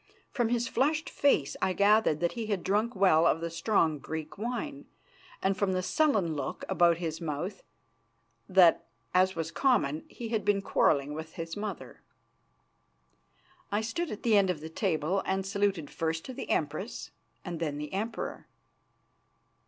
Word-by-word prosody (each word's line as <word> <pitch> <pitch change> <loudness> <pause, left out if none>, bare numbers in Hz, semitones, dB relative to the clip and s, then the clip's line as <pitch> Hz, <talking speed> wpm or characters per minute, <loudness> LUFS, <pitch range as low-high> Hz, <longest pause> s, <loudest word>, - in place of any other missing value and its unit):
From 240 -3 0
his 240 0 0
flushed 300 +5 0
face 165 - +2
I 185 - +2
gathered 200 -5 +3
that 175 - +1
he 230 -2 -5
had 200 -4 -1
drunk 210 +5 0
well 170 -4 +5
of 165 - +2
the 170 0 -4
strong 165 -4 +1
Greek 155 +1 -6
wine, 250 +6 -4 0.6
and 195 0 +2
from 190 0 0
the 185 0 -1
sullen 205 - +2
look 145 - -4
about 170 -1 +4
his 165 -1 -4
mouth 165 +5 -4 0.9
that, 180 -3 +5 0.3
as 185 +1 +3
was 165 0 -3
common, 165 - +1
he 235 -2 -7
had 220 -2 -1
been 200 -1 +1
quarrelling 145 -5 +2
with 160 +1 -7
his 165 -2 -5
mother. 205 -3 -6 1.7
I 205 +2 +1
stood 290 +10 -2
at 210 - -7
the 230 -3 +4
end 200 -2 +4
of 180 -4 -1
the 160 +1 -7
table 160 +3 0
and 190 0 -1
saluted 195 -6 -1
first 160 0 -2
the 260 - -7
Empress 155 +9 -2 0.3
and 175 -3 -4
then 150 -3 -2
the 150 +2 -6
Emperor. 215 +4 -4
190 Hz, 160 wpm, -29 LUFS, 160-215 Hz, 1.7 s, well